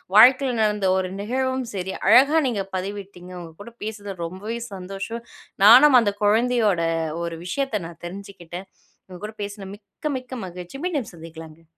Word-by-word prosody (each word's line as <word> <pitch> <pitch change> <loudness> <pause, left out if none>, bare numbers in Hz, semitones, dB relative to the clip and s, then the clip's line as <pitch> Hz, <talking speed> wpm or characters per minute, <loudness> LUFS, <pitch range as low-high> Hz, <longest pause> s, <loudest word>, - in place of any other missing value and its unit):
வாழ்க்கைல 255 +3 +7
நடந்த 210 -2 +1
ஒரு 185 -1 -2
நிகழ்வும் 260 +4 -1
சரி, 190 -1 -3
அழகா 270 +9 +6
நீங்கப் 195 -6 -3
பதிவிட்டீங்க. 190 -1 -7
உங்க 165 -1 -10
கூடப் 235 +3 -12
பேசுறது 205 -2 -6
ரொம்பவே 205 +7 -5
சந்தோஷம். 195 +5 -6 0.4
நானும் 255 +5 +9
அந்தக் 205 -2 -1
குழந்தையோட 220 -3 +3 0.4
ஒரு 170 -1 -4
விஷயத்தை 230 +3 -1
நான் 170 0 -13
தெரிஞ்சுகிட்டேன். 190 -1 -9 0.4
உங்க 185 -1 -10
கூடப் 215 0 -8
பேசுனா 200 -1 -7
மிக்க, 205 +7 -19
மிக்க 255 0 -9
மகிழ்ச்சி. 180 +6 -9
மீண்டும் 295 - -2
சந்திக்கலாங்க. 160 -1 -11
205 Hz, 145 wpm, -23 LUFS, 185-235 Hz, 0.4 s, நானும்